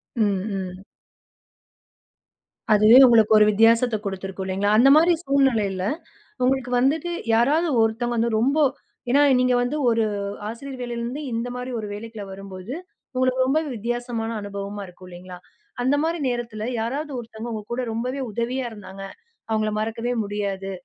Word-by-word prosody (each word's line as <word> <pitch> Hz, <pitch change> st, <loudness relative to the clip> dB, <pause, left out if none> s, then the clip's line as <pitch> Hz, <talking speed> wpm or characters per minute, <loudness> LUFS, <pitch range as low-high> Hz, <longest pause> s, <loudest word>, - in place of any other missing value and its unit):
ம், 205 Hz, -5 st, +1 dB, 0.3 s
ம். 190 Hz, -, -14 dB, 1.9 s
அதுவே 215 Hz, +3 st, +7 dB
உங்களுக்கு 225 Hz, -3 st, +5 dB
ஒரு 210 Hz, -, +6 dB
வித்தியாசத்த 225 Hz, +2 st, +4 dB
குடுத்திருக்கும் 195 Hz, -1 st, -5 dB
இல்லைங்களா? 195 Hz, +2 st, 0 dB
அந்த 260 Hz, +4 st, +6 dB
மாரி 335 Hz, +3 st, +5 dB
சூழ்நிலையில, 230 Hz, -9 st, +1 dB, 0.6 s
உங்களுக்கு 255 Hz, -1 st, +1 dB
வந்துட்டு 290 Hz, +7 st, +1 dB, 0.2 s
யாராவது 290 Hz, +9 st, +3 dB
ஒருத்தவங்க 235 Hz, +2 st, 0 dB
வந்து 230 Hz, +1 st, +1 dB
ரொம்ப, 265 Hz, +6 st, +2 dB, 0.5 s
ஏன்னா 280 Hz, +3 st, +5 dB, 0.2 s
நீங்க 255 Hz, 0 st, +3 dB
வந்து 245 Hz, +5 st, -1 dB
ஒரு 225 Hz, -1 st, +2 dB, 0.4 s
ஆசிரியர் 255 Hz, +3 st, -7 dB
வேலையிலேருந்து, 240 Hz, +4 st, -4 dB
இந்த 230 Hz, +2 st, -2 dB
மாரி 250 Hz, +1 st, -5 dB
ஒரு 215 Hz, -, -5 dB
வேலைக்குள்ள 220 Hz, 0 st, -8 dB
வரும்போது, 195 Hz, +3 st, -8 dB, 0.4 s
உங்களுக்கு 255 Hz, 0 st, +2 dB
ரொம்பவே 305 Hz, +3 st, +1 dB
வித்தியாசமான 235 Hz, 0 st, -3 dB
அனுபவமா 200 Hz, 0 st, -6 dB
இருக்கும் 180 Hz, 0 st, -14 dB
இல்லைங்களா? 180 Hz, 0 st, -10 dB, 0.4 s
அந்த 260 Hz, +3 st, +2 dB
மாரி 335 Hz, +1 st, -1 dB
நேரத்துல 235 Hz, -3 st, -4 dB, 0.2 s
யாராவது 280 Hz, +7 st, -3 dB
ஒருத்தவங்க 230 Hz, 0 st, -7 dB
உங்க 215 Hz, -1 st, -4 dB
கூட 250 Hz, +2 st, -1 dB
ரொம்பவே 250 Hz, +4 st, -3 dB
உதவியா 245 Hz, +4 st, -2 dB
இருந்தாங்க. 195 Hz, -2 st, -10 dB, 0.5 s
அவங்கள 215 Hz, -1 st, +1 dB
மறக்கவே 230 Hz, +2 st, -2 dB
முடியாது. 200 Hz, -1 st, -3 dB
230 Hz, 135 wpm, -23 LUFS, 205-255 Hz, 1.9 s, அதுவே